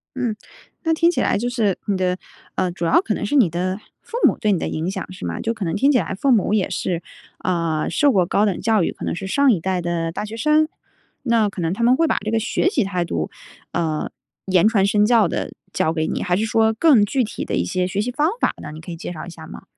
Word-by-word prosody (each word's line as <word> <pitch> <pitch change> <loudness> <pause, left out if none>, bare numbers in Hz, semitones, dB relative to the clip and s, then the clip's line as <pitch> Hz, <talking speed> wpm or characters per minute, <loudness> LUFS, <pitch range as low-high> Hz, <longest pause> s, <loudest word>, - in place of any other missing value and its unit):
嗯， 240 -5 -1 0.5
那 325 -2 +2
听 335 +1 +3
起 350 - 0
来 - - +2
就 240 - -2
是 220 -6 0
你 200 - 0
的， 185 -1 0 0.4
呃， 185 -1 +1
主 175 - -6
要 165 - +4
可 220 - -1
能 - - -3
是 290 - -1
你 230 - +5
的 185 +4 -2 0.2
父 470 - -6
母 - - +1
对 210 -2 +1
你 180 - +1
的 - - -2
影 165 +4 -2
响， 190 -1 -5
是 - - -8
吗？ 85 -1 -3
就 230 - -1
可 215 -3 -6
能 165 - -1
听 275 +8 +3
起 270 - +4
来 - - -3
父 270 +6 +1
母 210 -2 +3
也 205 -3 +1
是， 175 -2 -2 0.4
呃， 165 -4 0
受 290 -1 +3
过 185 -7 +3
高 205 +4 +2
等 195 -4 -1
教 220 -4 +2
育， - - 0
可 - - -7
能 - - -2
是 195 - -5
上 275 +7 +3
一 185 - +2
代 185 0 -1
的 170 -1 -2
大 210 - -4
学 215 +2 -7
生。 305 +5 +3 0.6
那 230 -4 +3
可 190 - -6
能 165 0 0
他 220 +5 -2
们 245 +2 +5
会 330 +2 +2
把 - - +1
这 215 - -1
个 225 - +2
学 225 - 0
习 380 - +1
态 180 -3 -1
度， 80 - -2 0.4
呃， 160 -3 -1 0.4
言 185 +2 +4
传 200 -4 +3
身 210 +1 +3
教 225 -3 +4
地 - - -3 0.2
教 160 - 0
给 160 -1 -1
你？ - - -2
还 180 - +1
是 215 +3 0
说 220 0 +2
更 240 -4 +5
具 255 +4 0
体 215 - -5
的 - - -2
一 85 - +1
些 180 - -1
学 195 +2 -1
习 245 - -2
方 295 +5 +1
法 - - +2
呢？ 150 - -7
你 155 - -9
可 175 - -8
以 165 - -6
介 175 - -6
绍 160 - -7
一 175 - -8
下 170 - -11
吗？ - - -10
200 Hz, 295 characters per minute, -21 LUFS, 175-230 Hz, 0.6 s, 你